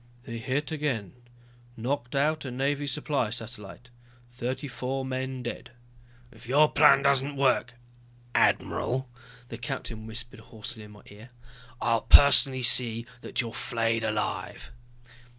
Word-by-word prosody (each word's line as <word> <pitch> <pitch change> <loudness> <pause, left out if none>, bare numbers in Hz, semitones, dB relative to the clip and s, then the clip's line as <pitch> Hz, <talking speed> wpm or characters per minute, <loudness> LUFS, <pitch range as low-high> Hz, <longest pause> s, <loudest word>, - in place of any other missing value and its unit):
"They 115 -2 -7
hit 135 +7 -2
again, 140 - -3 0.6
knocked 120 +2 -3
out 155 +3 +1
a 135 - -5
Navy 140 +3 -2
supply 140 -3 -1
satellite, 115 0 -9 0.4
thirty 125 +3 -4
four 135 0 -4
men 130 0 -4
dead." 120 0 -7 0.6
"If - - -15
your 150 +3 +4
plan 140 -2 +5
doesn't 140 +1 +2
work, 130 -2 +1 0.6
admiral," 130 0 +1 0.4
the 115 - -8
captain 115 -3 -6
whispered 115 +1 -7
hoarsely 110 0 -9
in 105 - -12
my 105 - -16
ear, 105 +4 -14 0.5
"I'll 115 -2 +1
personally 135 -2 +6
see 120 -2 +5 0.2
that - - -2
you're 115 -2 -6
flayed 115 -1 -1
alive!" 110 -1 -3
125 Hz, 130 wpm, -27 LUFS, 115-135 Hz, 0.6 s, personally